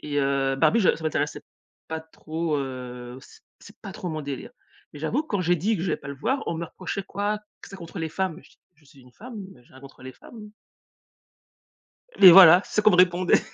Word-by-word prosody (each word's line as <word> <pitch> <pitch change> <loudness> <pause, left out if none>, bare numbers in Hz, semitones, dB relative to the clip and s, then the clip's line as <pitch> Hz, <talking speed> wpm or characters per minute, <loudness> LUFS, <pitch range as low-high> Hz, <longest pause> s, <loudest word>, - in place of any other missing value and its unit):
Et 145 -1 -3
heu, 135 -1 0
Barbie, 160 +11 +3
je 185 - +3
ça 165 - -11
m'intéressait 150 -1 -2 0.5
pas 160 0 -4
trop, 160 0 -4
heu, 125 -2 -7
c - - -18 0.2
c'est 205 - -16
pas 200 -4 -9
trop 180 - -6
mon 155 -2 -5
délire. 145 - -7 0.4
Mais 145 - -11
j'avoue 235 - -1
que 310 - -24
quand 205 - -1
j'ai 175 0 +1
dit 210 +7 -1
que 165 - -5
j'allais 175 -4 -1
pas 140 - -11
le 140 - -6
voir, 260 - -2
on - - -2
me 170 - -4
reprochait, 185 +3 -6
quoi, 205 +2 -3 0.2
q - - -11
c'est 195 - -9
contre 170 0 -10
les 160 -1 -3
femmes. 185 +1 -3
Mais, - - -14
je - - -22
dis: - - -27 0.2
«Je 150 - -28
suis 140 -1 -20
une 125 0 -20
femme, 235 - -11 0.2
mais 125 - -20
j'ai - - -26
rien 130 - -15
contre 135 -1 -15
les 130 - -9
femmes». 210 - -14 1.7
Mais 190 -3 +10
voilà, 180 0 +9
c'est - - -11
ça 210 - +3
qu'on 215 0 +5
me - - +3
répondait. 180 0 +3
165 Hz, 245 wpm, -24 LUFS, 140-195 Hz, 1.7 s, Mais